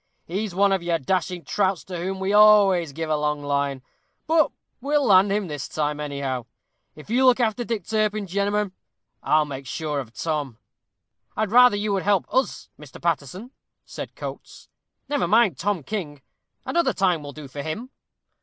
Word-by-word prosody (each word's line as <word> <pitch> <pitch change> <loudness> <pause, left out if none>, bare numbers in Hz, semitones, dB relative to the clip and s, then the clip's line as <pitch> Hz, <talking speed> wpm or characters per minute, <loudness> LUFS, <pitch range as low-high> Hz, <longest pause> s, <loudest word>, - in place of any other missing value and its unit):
He's 195 +2 -4
one 200 +1 +4
of 190 -2 +1
your 170 -1 0
dashing 175 +3 -2
trouts 195 -3 0
to 180 -2 -6
whom 190 +2 -3
we 190 +1 -1
always 205 -6 +6
give 160 +3 -4
a - - +3
long 150 -1 -1
line, 140 -2 -1 0.4
but 320 -1 +3 0.3
we'll 290 +1 +1
land 195 0 +5
him 205 0 0
this 150 -5 -5
time, 150 -1 -2
anyhow. 140 -4 -3 0.5
If 155 +7 -12
you'll 260 +2 +4
look 255 0 +5
after 235 0 0
Dick 225 -6 -3
Turpin, 215 -1 0
gemmen, 200 +2 -1 0.5
I'll 155 0 +3
make 135 -2 -7
sure 150 +1 -3
of 125 -5 -7
Tom." 150 -7 -3 0.8
"I'd 215 -2 0
rather 250 -1 +7
you 205 0 -1
would 195 - 0
help 200 -2 +2
us, 260 0 0
Mr. 150 -3 -12
Paterson," 170 - -3 0.3
said - - -8
Coates; - - -9 0.4
"never 285 -10 0
mind 210 - +3
Tom 195 -4 -1
King; 150 -8 -5 0.4
another 340 0 +1
time 180 -5 +1
will 145 -1 -8
do 150 -2 -9
for 140 +2 -7
him." 215 - -5
185 Hz, 175 wpm, -24 LUFS, 150-210 Hz, 0.8 s, rather